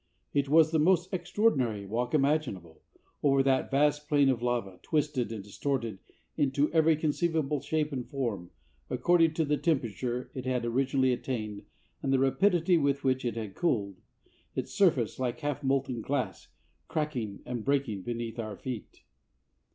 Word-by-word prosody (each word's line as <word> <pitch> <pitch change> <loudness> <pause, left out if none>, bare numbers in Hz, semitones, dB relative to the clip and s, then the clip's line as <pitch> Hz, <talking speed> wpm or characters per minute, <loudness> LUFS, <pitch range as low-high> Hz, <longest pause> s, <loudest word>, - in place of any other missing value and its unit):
It 140 -1 +1
was 160 +1 +5
the 160 - +2
most 180 +3 +3
extraordinary 175 - +1
walk 120 +6 -1
imaginable, 135 - 0 0.4
over 135 -1 +4
that 135 -1 +2
vast 150 +1 +2
plain 145 -2 +4
of 125 -3 0
lava, 120 -7 -2
twisted 150 -6 0
and 110 -3 -5
distorted 115 -1 -3 0.4
into 140 +2 +1
every 160 -1 +5
conceivable 155 -2 0
shape 155 -1 -1
and 125 -3 -4
form, 115 - -3 0.4
according 165 +4 +3
to 160 - +1
the 150 0 +1
temperature 125 - -1
it 130 -3 -5
had 125 -2 0
originally 130 +2 +2
attained 110 -5 -4 0.4
and 135 - -1
the 135 - +4
rapidity 170 +5 +3
with 140 -1 +1
which 130 -1 +1
it 120 -3 -2
had 110 -4 -5
cooled, 100 - -1 0.5
its - - -4
surface, 140 - +2
like 125 -2 -2
half 145 -1 -2
molten 135 -3 0
glass, 135 +2 -3 0.4
cracking 125 -10 -3
and 120 -3 -4
breaking 135 -7 0
beneath 115 +2 -4
our 110 -3 -4
feet. 125 -5 -7
135 Hz, 150 wpm, -29 LUFS, 120-150 Hz, 0.5 s, was